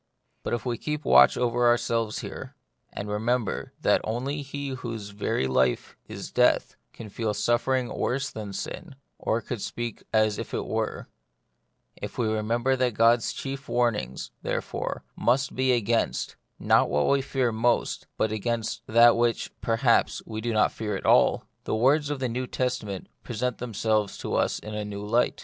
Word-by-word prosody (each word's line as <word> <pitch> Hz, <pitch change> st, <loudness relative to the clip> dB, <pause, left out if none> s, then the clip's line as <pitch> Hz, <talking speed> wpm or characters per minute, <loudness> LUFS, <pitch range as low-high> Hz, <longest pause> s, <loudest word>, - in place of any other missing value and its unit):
But -, -, -1 dB
if 120 Hz, -, -6 dB
we 120 Hz, -2 st, -2 dB
keep 150 Hz, -1 st, -3 dB
watch 65 Hz, 0 st, +7 dB
over 120 Hz, 0 st, +2 dB
ourselves 115 Hz, -2 st, +1 dB
here, -, -, -8 dB, 0.4 s
and 100 Hz, -, -5 dB
remember 110 Hz, +2 st, -1 dB
that -, -, +3 dB
only 130 Hz, +6 st, -2 dB
he 140 Hz, 0 st, -5 dB
whose 115 Hz, -5 st, -5 dB
very 100 Hz, -9 st, -1 dB
life 65 Hz, -1 st, +1 dB
is -, -, -7 dB
death -, -, +3 dB, 0.2 s
can 115 Hz, -, -9 dB
feel 105 Hz, 0 st, -2 dB
suffering 125 Hz, +3 st, +1 dB
worse 135 Hz, +2 st, -1 dB
than 105 Hz, -2 st, -6 dB
sin, 145 Hz, -, -6 dB, 0.2 s
or 115 Hz, -, 0 dB
could 115 Hz, -3 st, -5 dB
speak 120 Hz, 0 st, -4 dB
as 110 Hz, -1 st, +2 dB
if -, -, -5 dB
it -, -, -2 dB
were; -, -, -2 dB, 0.9 s
if -, -, -7 dB
we 120 Hz, -, +1 dB
remember 115 Hz, +4 st, +1 dB
that 125 Hz, -3 st, 0 dB
God's 115 Hz, +1 st, +4 dB
chief 135 Hz, 0 st, -6 dB
warnings, 110 Hz, -, 0 dB
therefore, -, -, -3 dB
must 135 Hz, +3 st, +1 dB
be 130 Hz, 0 st, +2 dB
against, 115 Hz, -1 st, 0 dB, 0.2 s
not -, -, +3 dB
what 75 Hz, -, +2 dB
we 140 Hz, 0 st, +3 dB
fear 130 Hz, -3 st, 0 dB
most, 115 Hz, +2 st, 0 dB
but 110 Hz, -, +1 dB
against 115 Hz, +1 st, -2 dB
that 115 Hz, +1 st, +7 dB
which, 120 Hz, 0 st, 0 dB
perhaps, 115 Hz, +1 st, +2 dB
we 110 Hz, -1 st, -5 dB
do 120 Hz, +1 st, -1 dB
not 110 Hz, -1 st, +3 dB
fear 105 Hz, -2 st, -3 dB
at -, -, -6 dB
all, -, -, +4 dB, 0.2 s
the -, -, 0 dB
words 140 Hz, +6 st, +3 dB
of 145 Hz, -2 st, -2 dB
the 130 Hz, -, 0 dB
New 125 Hz, +2 st, -3 dB
Testament 125 Hz, -8 st, -2 dB, 0.2 s
present 125 Hz, +1 st, -3 dB
them 120 Hz, -3 st, -6 dB
selves 110 Hz, -1 st, +1 dB
to -, -, -5 dB
us -, -, +1 dB
in 105 Hz, -, -8 dB
a 105 Hz, 0 st, -2 dB
new 105 Hz, 0 st, -6 dB
light. 120 Hz, +4 st, +1 dB
115 Hz, 170 wpm, -26 LUFS, 110-125 Hz, 0.9 s, watch